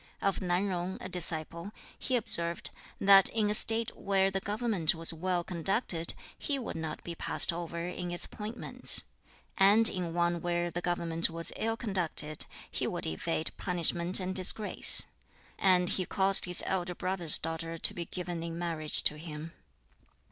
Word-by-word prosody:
Of 195 -1 -1
Nan 180 +1 0
Yung, 185 -1 -3
a - - -7
disciple, 170 0 -4 0.3
he 255 - -2
observed, 170 -7 0 0.3
that 195 -1 +6
in 215 -2 0
a - - 0
State 225 +1 +1
where 195 -1 0
the 195 - -2
government 205 -5 0
was 165 +1 0
well 175 +1 -2
conducted 175 -1 -2 0.2
he 285 - -2
would 250 - -6
not 160 -1 -6
be 170 - -6
passed 170 - +6
over 170 0 -6
in 180 0 -5
its 175 0 -2
appointments, 215 +3 -4 0.6
and 205 +4 +7
in 175 -4 -1
one 170 -1 0
where 175 0 -2
the 175 - -4
government 170 -2 0
was 165 0 -4
ill 225 +1 -2
conducted 170 -8 -1 0.2
he - - -3
would - - -3
evade 160 - -2
punishment 175 0 +2
and 185 0 -3
disgrace. 190 +3 +4 0.5
And 180 -2 +3
he 185 0 +1
caused 195 0 +4
his 180 -1 +1
elder 180 -2 -2
brother's 180 -4 0
daughter 165 +1 -4
to - - 0
be 170 - -5
given 175 -2 -5
in 165 0 -6
marriage 165 -3 +1
to 150 - 0
him. 160 0 -8
175 Hz, 160 wpm, -30 LUFS, 165-195 Hz, 0.6 s, and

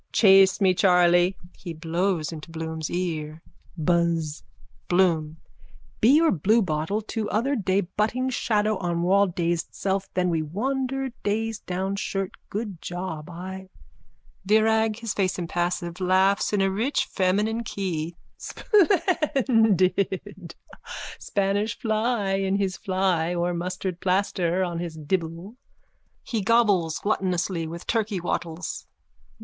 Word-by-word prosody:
Chase 195 -2 +6
me, 190 -2 +4
Charley! 180 0 +4 0.2
(He 175 -3 -7
blows 165 +1 -1
into 160 0 -8
Bloom's 160 -1 -4
ear.) 160 -3 -3 0.3
Buzz! 165 -2 0 0.5
BLOOM: 165 -4 +2 0.6
Bee 270 +7 +6
or 330 -1 +4
bluebottle 190 0 +1
too 220 0 -3
other 265 +7 +1
day 195 -3 +1
butting 215 +7 -1
shadow 215 -3 +1
on 170 -2 -1
wall 200 +3 +4
dazed 170 -1 -2
self 195 0 -2
then 180 -1 +1
me 165 -1 +1
wandered 265 - -2
dazed 220 +1 -2
down 190 +2 -2
shirt 195 -1 -2 0.2
good 205 -5 -5
job 175 -3 -5
I... 190 +2 -8 0.7
VIRAG: 220 +1 +3
(His 230 -4 -3
face 190 -2 0
impassive, 175 +1 -2
laughs 190 +2 +3
in 205 -2 +1
a 195 0 +2
rich 230 +9 0
feminine 210 +5 0
key.) 175 -6 -3 0.2
Splendid! 225 - +1 0.6
Spanish 200 +2 -1
fly 220 -2 0
in 195 0 0
his 195 -2 0
fly 185 -4 0
or 175 0 0
mustard 180 +1 -4
plaster 185 -1 +1
on 175 -2 -3
his 170 -2 -5
dibble. 165 - -3 0.7
_(He 220 -4 -2
gobbles 200 -8 +3
gluttonously 180 -4 -1
with 170 +2 -8
turkey 215 -4 0
wattles.) 170 -1 -4
190 Hz, 120 wpm, -25 LUFS, 170-210 Hz, 0.7 s, Chase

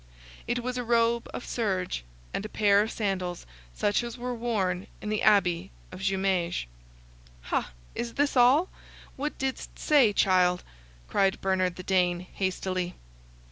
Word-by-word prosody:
It 240 0 -1
was 250 0 -2
a - - -2
robe 235 0 +2
of - - -6
serge, 185 - -1 0.3
and - - -2
a 215 - -6
pair 205 -1 +4
of 215 - -1
sandals, 185 -4 -2 0.3
such 205 - +1
as 235 0 -6
were 250 +1 -3
worn 205 -6 -1
in 210 - -5
the 215 0 0
Abbey 190 -3 +3 0.2
of 185 - -8
Jumieges. 190 - 0 0.8
"Ha! - - -2 0.2
is 235 -1 -4
this 285 0 +1
all? 260 +8 +5 0.5
What 295 +3 -3
didst 265 -1 -4
say, 280 -8 +4
child?" 180 -2 +3 0.4
cried 195 -1 +2
Bernard 185 -2 +1
the 185 - -8
Dane, 180 -2 +2
hastily. 185 -1 -2
200 Hz, 145 wpm, -28 LUFS, 185-235 Hz, 0.8 s, all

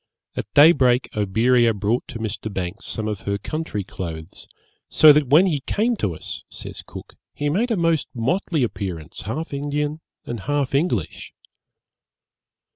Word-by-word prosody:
At 105 - -5
day 150 +3 +9
break 125 -5 +2
Oberea 115 +3 +3
brought 105 +5 -1
to 125 - -7
Mr. 110 -1 -4
Banks 90 -3 -5
some 110 -1 -3
of 105 -3 -3
her 100 +1 -2
country 155 -5 -4
clothes; 85 -2 -7 0.4
'so 155 -1 +8
that 150 -2 +2
when 155 +8 +6
he 160 -6 +1
came 230 +3 +1
to 95 - -1
us,' - - -7
says - - -8
Cook, - - -11 0.2
'he 145 0 -1
made 215 +11 +1
a 225 - +1
most 165 -4 +1
motley 155 +5 0
appearance, 90 - -4
half 145 +10 -4
Indian 145 +2 -2 0.3
and 120 - -5
half 140 +4 -1
English.' 135 - -1
125 Hz, 155 wpm, -22 LUFS, 105-150 Hz, 0.4 s, day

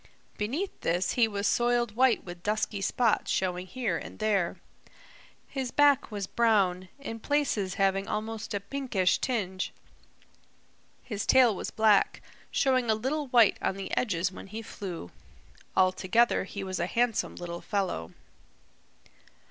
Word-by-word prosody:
Beneath 280 - -3
this 175 +3 +1
he 235 -2 +3
was 205 -1 -3
soiled 240 -2 +1
white 255 -1 +3
with 175 -1 -9
dusky 210 0 -1
spots 230 +3 +1
showing 180 -1 -1
here 225 -7 -2
and - - -10
there. 205 -5 +1 0.9
His 265 -3 -3
back 285 0 +4
was 205 -3 -4
brown, 190 -5 +2
in 255 -5 -6
places 225 -9 0
having 195 -1 +1
almost 215 0 -4
a - - 0
pinkish 200 -3 0
tinge. 190 -7 -2 1.3
His 210 -4 -4
tail 250 -5 +6
was - - -4
black, 215 -2 +3 0.3
showing 255 -3 +2
a 220 - +4
little 275 +7 -2
white 240 -4 +5
on - - 0
the 195 - -4
edges 180 -6 0
when 190 - -10
he 220 +3 -7
flew. 180 - -7 0.7
All 185 0 +5
together 195 +4 +2
he 200 0 -6
was 185 -1 -4
a 170 - 0
handsome 235 +2 0
little 175 -1 -6
fellow. 190 - -2
210 Hz, 140 wpm, -28 LUFS, 190-240 Hz, 1.3 s, tail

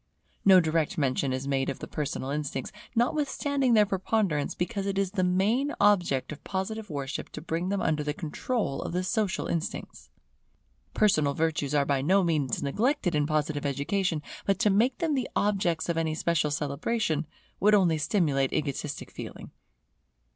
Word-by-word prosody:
No 190 -2 +8
direct 160 -2 0
mention 135 -2 +1
is 130 +1 -3
made 135 -1 0
of - - -3
the - - -7
personal 145 -3 -3
instincts, 145 -3 -3 0.2
notwithstanding 275 0 +1
their 210 -1 +6
preponderance, 190 -5 0
because 200 +2 -2
it 195 -1 -1
is 195 -2 +1
the 190 -2 0
main 210 +11 +1
object 180 -11 +3
of 150 - -9
Positive 210 +3 -4
worship 140 -2 -4
to - - -5
bring 165 +3 -2
them 200 -1 -1
under 155 -2 +1
the 150 - -1
control 170 - -2
of - - -5
the 180 +1 0
social 210 -1 0
instincts. 170 +6 -4 0.9
Personal 155 -9 +3
virtues 155 -3 0
are 140 -1 +3
by 140 -2 +1
no 190 +7 +3
means 150 -7 0
neglected 210 - +1
in 150 -1 +1
Positive 155 -1 0
education; 150 +4 -1 0.2
but 195 -2 +1
to 210 0 +3
make 235 +6 +2
them 330 -3 0
the 260 -3 -1
objects 190 -6 +1
of 170 -1 -1
any 160 -1 -1
special 160 -1 +1
celebration, 155 +3 -1 0.3
would 210 +2 +5
only 175 -6 +3
stimulate 145 -6 +1
egotistic 140 -3 -3
feeling. - - -8
170 Hz, 165 wpm, -28 LUFS, 150-205 Hz, 0.9 s, No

